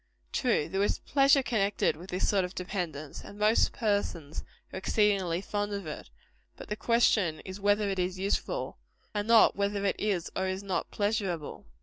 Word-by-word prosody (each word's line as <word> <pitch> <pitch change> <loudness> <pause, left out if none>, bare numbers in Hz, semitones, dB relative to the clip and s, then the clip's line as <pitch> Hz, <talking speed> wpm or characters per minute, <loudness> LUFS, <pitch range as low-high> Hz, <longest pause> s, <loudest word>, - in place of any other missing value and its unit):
True, 230 - +1
there 195 +3 -1
is 205 - +1
pleasure 275 0 +4
connected 205 -8 +1
with 175 +5 -12
this 180 - -1
sort 195 -2 +2
of 180 +1 -5
dependence 175 -6 -5
and 205 - -11
most 215 +2 +3
persons 195 -8 -2 0.3
are - - -4
exceedingly 190 -3 +1
fond 205 +1 -2
of 200 -3 -4
it; 150 - -7 0.5
but - - -10
the 210 - -1
question 215 -8 +2
is 190 +1 -8
whether 205 +1 +2
it 195 -1 -2
is 180 +1 -1
useful 200 - -2 0.3
and 205 0 -2
not 230 -1 +6
whether 200 0 -1
it 195 - 0
is 195 -5 -1
or 190 - 0
is 185 +1 -3
not 190 -2 -2
pleasurable. 200 - -2
200 Hz, 180 wpm, -29 LUFS, 180-210 Hz, 0.5 s, not